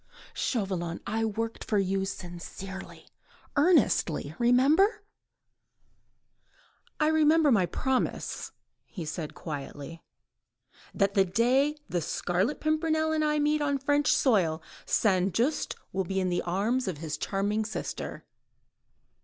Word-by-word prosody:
"Chauvelin, 185 -7 -2
I 225 +1 -1
worked 225 +1 -3
for 210 - 0
you, 195 0 +1
sincerely, 190 +1 -8 0.5
earnestly... 285 - +3
remember... 300 - +4 1.3
." - - -35
"I 305 - +3
remember 310 -1 +4
my 195 -6 +3
promise," 260 +8 -2 0.4
he 175 -5 -7
said 155 0 -5
quietly; 145 +1 -7 0.9
"the 195 - +2 0.2
day 245 +10 +2
that 300 - -24
the 175 - -1
Scarlet 180 - -1
Pimpernel 315 0 +1
and 310 -1 +1
I 300 0 +2
meet 300 +1 +2
on 285 -1 +1
French 290 +2 +2
soil, 180 - +3 0.3
St. 190 -3 +2
Just 275 +7 0 0.2
will 190 0 -1
be 190 +2 -1
in 185 -1 0
the 175 0 0
arms 210 +8 0
of 180 -5 -2
his 155 0 -4
charming 205 +2 -1
sister." 215 0 -5
215 Hz, 120 wpm, -28 LUFS, 180-290 Hz, 1.3 s, remember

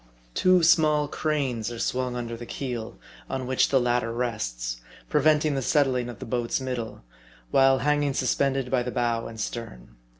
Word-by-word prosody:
Two 185 -1 +4
small 155 -3 +4
cranes 135 -8 -1
are 120 - -6
swung 125 +1 -1
under 120 -1 -4
the 120 0 -9
keel, 120 -5 -5 0.3
on 130 -1 -3
which 130 0 +2
the 135 - +4
latter 120 -1 +1
rests, - - -3 0.3
preventing 150 0 +3
the 135 - -1
settling 130 -3 +1
of 120 - -8
the - - -8
boat's 120 +1 -1
middle, 125 -4 -5 0.5
while 135 0 +5
hanging 145 0 +1
suspended 135 0 0
by 130 -2 +2
the 125 - -3
bow 120 -2 -1
and 115 -1 -9
stern. 85 - -6
125 Hz, 165 wpm, -26 LUFS, 115-140 Hz, 0.5 s, while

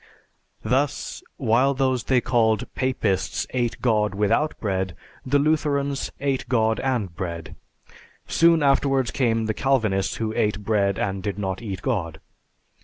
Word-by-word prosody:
Thus, 140 +3 -1 0.2
while 130 +3 +2
those 130 -2 0
they 130 -2 +3
called 110 -4 +2
Papists 110 -8 -1
ate 120 -2 -1
God 105 -4 +2
without 105 +10 +1
bread, 95 -3 -2 0.3
the 140 +2 +2
Lutherans 140 -2 0
ate 135 -3 -1
God 110 -2 +2
and 115 -10 -1
bread; 85 -3 -5 0.7
soon 165 -2 +4
afterwards 135 -2 +2
came 115 -4 +1
the 110 - -1
Calvinists, 110 -7 +1
who 110 -1 -2
ate 105 -1 0
bread 100 -2 +1
and 95 -1 -2
did 100 -1 -3
not 95 -1 -3
eat 95 -5 -6
God." 85 - -2
115 Hz, 135 wpm, -24 LUFS, 100-135 Hz, 0.7 s, soon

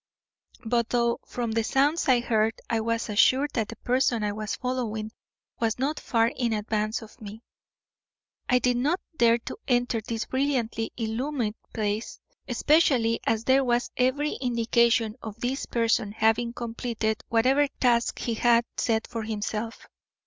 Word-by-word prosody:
But 235 0 +1
though 235 -1 +1
from 235 -2 -3
the 225 0 +1
sounds 285 +8 +1
I 245 -2 +5
heard 220 -2 +1
I 230 - 0
was 230 0 -1
assured 260 +7 +3
that 220 -4 0
the 230 - -8
person 245 -1 +1
I 210 - 0
was 215 +1 -4
following 225 -4 -3 0.5
was 225 -2 0
not 280 +4 -1
far 230 -1 +2
in 235 -3 0
advance 215 +2 -1
of 220 +3 -16
me, 215 +2 -9 1.1
I 250 - +5
did 250 0 +1
not 300 +9 +1 0.2
dare 235 0 +5
to 240 - -8
enter 245 -2 +1
this 225 +1 -4
brilliantly 255 -5 -1
illumined 235 0 -2 0.2
space, 215 0 -3 0.3
especially 260 -7 +3
as 225 0 +1
there 265 +2 +4
was 240 -1 0
every 270 +4 +1
indication 235 -2 +2
of 220 0 -8
this 255 +4 -2
person 230 -3 +1
having 225 +2 +2
completed 230 -2 -3
whatever 260 +6 +3
task 235 -2 +2
he 235 - -2
had 235 +1 +3
set 220 -1 +1
for 230 - -5
himself. 220 +1 -4
235 Hz, 150 wpm, -26 LUFS, 220-250 Hz, 1.1 s, I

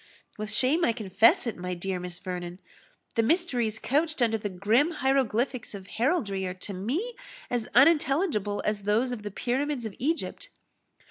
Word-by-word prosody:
"With 215 0 -5
shame 265 +10 +3
I 235 - +3
confess 215 0 +4
it, 230 - -3
my 180 0 -4
dear 185 +1 -3
Miss 180 -1 -4
Vernon, 180 -1 -6 0.6
the 230 - +2
mysteries 240 - +1
couched 305 +6 0
under 230 -2 +3
the 205 - -3
grim 215 - +2
hieroglyphics 260 -4 0
of 195 -1 -9
heraldry 220 - 0
are 180 - -5
to 195 +2 -5
me 275 - -2 0.4
as 240 -3 -1
unintelligible 275 - +3
as 210 -1 0
those 215 +5 +1
of 240 -3 -4
the 205 - -5
pyramids 255 +4 -2
of 215 - -5
Egypt." 320 +6 -2
230 Hz, 160 wpm, -27 LUFS, 200-275 Hz, 0.6 s, confess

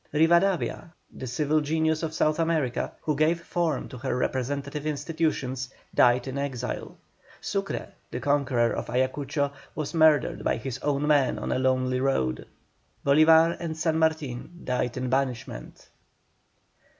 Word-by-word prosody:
Rivadavia, 170 +2 +2 0.2
the 130 - -7
civil 150 +5 +1
genius 160 +1 0
of 160 -2 -2
South 155 0 +1
America, 160 -7 0
who 150 - -1
gave 155 +3 +2
form 170 -4 -1
to 125 - -9
her 130 0 -2
representative 140 +4 -2
institutions, 145 -4 -2 0.2
died 125 +1 +4
in 135 +1 -3
exile. 130 -3 -4 0.4
Sucre, - - -3 0.2
the - - -4
conqueror 140 -5 +2
of - - -4
Ayacucho, 140 +3 0 0.2
was 155 0 -4
murdered 155 -2 +3
by - - +1
his 130 +2 -5
own 145 0 0
men 145 -3 +3
on - - -3
a - - +1
lonely 130 -1 +1
road. 65 - 0 0.6
Bolívar 160 +3 +6
and 160 -2 -4
San 160 0 +1
Martin 160 0 -1
died 125 -1 -1
in 130 0 -2
banishment. 125 - -3
145 Hz, 140 wpm, -26 LUFS, 130-160 Hz, 0.6 s, Bolívar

